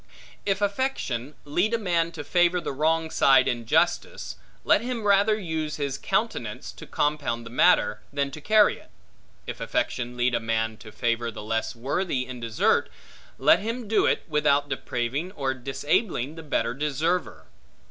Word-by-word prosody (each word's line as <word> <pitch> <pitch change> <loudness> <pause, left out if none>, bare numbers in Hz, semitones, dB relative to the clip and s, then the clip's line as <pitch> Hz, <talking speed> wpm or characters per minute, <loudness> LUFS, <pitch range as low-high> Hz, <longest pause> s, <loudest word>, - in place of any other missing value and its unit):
If 200 0 +1
affection 200 - -2
lead 180 +10 +1
a - - +1
man 170 -6 0
to 155 -2 -6
favor 175 +2 +3
the 170 - -4
wrong 160 +3 +1
side 135 -1 +5
in 120 -2 -2
justice, 60 - 0 0.3
let - - +4
him 240 -2 -3
rather 205 +1 +4
use 160 -6 -3
his 140 -2 -3
countenance - - -2
to - - -12
compound 145 -6 -1
the 115 - -9
matter, 120 -7 +3
than 140 -1 -1
to 155 - -9
carry 215 +5 +4
it. - - -19 0.6
If - - -7
affection 120 0 -2
lead 120 0 +2
a 115 - +2
man 110 -1 -1
to 110 - -12
favor 115 +1 -1
the 110 -2 -8
less 115 +2 -2
worthy 135 +2 -1
in 125 -1 -8
desert, 115 -2 +1 0.5
let - - +5
him 230 +2 -4
do 215 +1 +3
it, - - +1
without 150 -2 +2
depraving 135 +6 -3
or 135 -6 -1
disabling 135 - -1
the 165 - -9
better 120 -6 -1
deserver. 150 +5 -1
145 Hz, 165 wpm, -26 LUFS, 120-180 Hz, 0.6 s, side